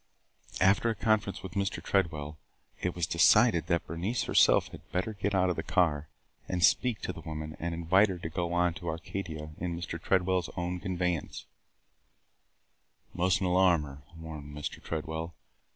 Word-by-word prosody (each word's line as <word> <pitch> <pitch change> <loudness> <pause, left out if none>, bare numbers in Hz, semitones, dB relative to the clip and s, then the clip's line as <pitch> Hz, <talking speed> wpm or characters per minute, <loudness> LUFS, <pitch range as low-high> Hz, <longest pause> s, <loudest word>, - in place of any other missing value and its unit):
After 95 +5 +4
a 115 - -1
conference 105 -3 0
with 95 - -6
Mr. 100 +1 -1
Tredwell, 75 -6 -1 0.4
it 90 - -1
was 85 -2 0
decided 85 +1 +4
that 85 -1 +1
Bernice 95 +8 -2
herself - - +4
had - - -13
better 95 +6 -1
get 100 0 -2
out 90 -1 +3
of - - -2
the 80 - -2
car 80 -5 +1 0.4
and 90 -2 -1
speak 120 +5 +3
to - - -3
the - - -10
woman 80 0 -6
and 85 +1 -3
invite 95 +5 +4
her 95 - -3
to 80 -1 -5
go 85 +1 -2
on 90 0 +2
to 85 0 -6
Arcadia 80 -2 -5
in 85 -1 -3
Mr. 85 -1 -5
Tredwell's 95 -2 +1
own 90 0 -2
conveyance. 90 -3 -2 1.7
"We - - -11
must 90 +2 +2
n't - - +1
alarm 90 -3 +4
her," 70 -1 -10 0.2
warned 75 -3 -8
Mr. 75 - -5
Tredwell. 80 +1 -4
85 Hz, 170 wpm, -30 LUFS, 80-95 Hz, 1.7 s, After